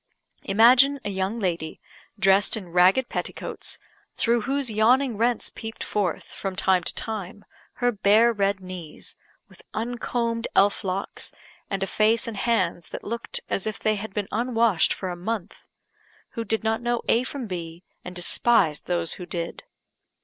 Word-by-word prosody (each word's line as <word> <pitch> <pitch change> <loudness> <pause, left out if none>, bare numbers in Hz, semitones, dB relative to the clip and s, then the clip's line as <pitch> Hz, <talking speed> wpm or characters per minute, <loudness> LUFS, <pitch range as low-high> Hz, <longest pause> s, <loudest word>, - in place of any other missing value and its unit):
Imagine 250 +7 +6
a 205 - -1
young 190 +4 -2
lady, 170 -5 -2 0.4
dressed 195 +1 +4
in 190 -5 -8
ragged 185 +8 +4
petticoats, - - -4 0.4
through 235 0 +2
whose 270 0 -1
yawning 240 +4 +3
rents 235 +2 +1
peeped 225 0 -7
forth, 195 -6 -1
from 195 -1 -6
time 190 -1 +3
to - - -3
time, 205 -2 -5 0.3
her 245 0 +1
bare 220 +2 +4
red 200 -2 +1
knees, 180 -4 -7 0.3
with - - -18
uncombed 235 0 -2
elf 200 +1 +4
locks, 190 0 -3 0.4
and 195 -1 -1
a - - +1
face 215 +4 +2
and 225 -3 -5
hands 185 -6 0
that - - -7
looked 235 +2 -3
as 195 - -1
if 215 - -3
they 215 - +1
had 215 0 -5
been 205 0 -3
unwashed 230 -4 +2
for 190 - -3
a - - -4
month 200 +2 -4 0.7
who 230 - -4
did 220 0 -1
not 220 +1 0
know 240 0 -1
A 235 - +3
from 260 -1 -5
B, 170 -3 -6 0.2
and 180 - -8
despised 175 -2 +2
those 170 -2 0
who 180 - -8
did. 170 -1 -5
210 Hz, 160 wpm, -25 LUFS, 185-235 Hz, 0.7 s, Imagine